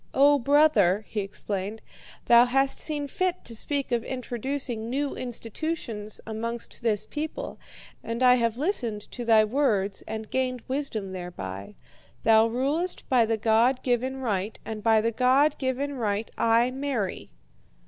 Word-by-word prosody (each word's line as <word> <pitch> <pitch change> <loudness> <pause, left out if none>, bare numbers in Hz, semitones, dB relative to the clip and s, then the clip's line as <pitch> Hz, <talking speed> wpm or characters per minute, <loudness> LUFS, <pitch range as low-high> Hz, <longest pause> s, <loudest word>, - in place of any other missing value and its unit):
"'O 285 +1 +6
brother,' 235 - +4
he 215 - -3
explained, 200 +1 -4 0.4
'thou 235 +1 +7
hast 270 +2 +1
seen 295 -2 -3
fit 370 +2 -2
to 230 - -5
speak 280 +3 -2
of 235 -1 +1
introducing 250 -2 -4
new 280 +3 -1
institutions 230 -2 -5
amongst 230 +2 -4
this 220 -4 0
people, 315 +11 -5 0.4
and 230 +2 -2
I 250 -1 +7
have 230 -2 +1
listened 250 - 0
to 245 - -6
thy 225 -2 +5
words 210 -6 0
and 220 0 -6
gained 255 -2 -1
wisdom 255 -8 -3
thereby. 135 - -7 0.5
Thou 225 0 +6
rulest 280 +10 -1
by 245 -4 +4
the 225 0 +1
God 230 +4 +2
given 255 +1 0
right, 215 -5 -2
and 220 -1 -5
by 220 0 +4
the 230 +1 0
God 260 +5 +3
given 270 +2 -1
right 220 -4 -2
I 230 +2 +3
marry.' 260 -7 -3
235 Hz, 145 wpm, -26 LUFS, 220-270 Hz, 0.5 s, thou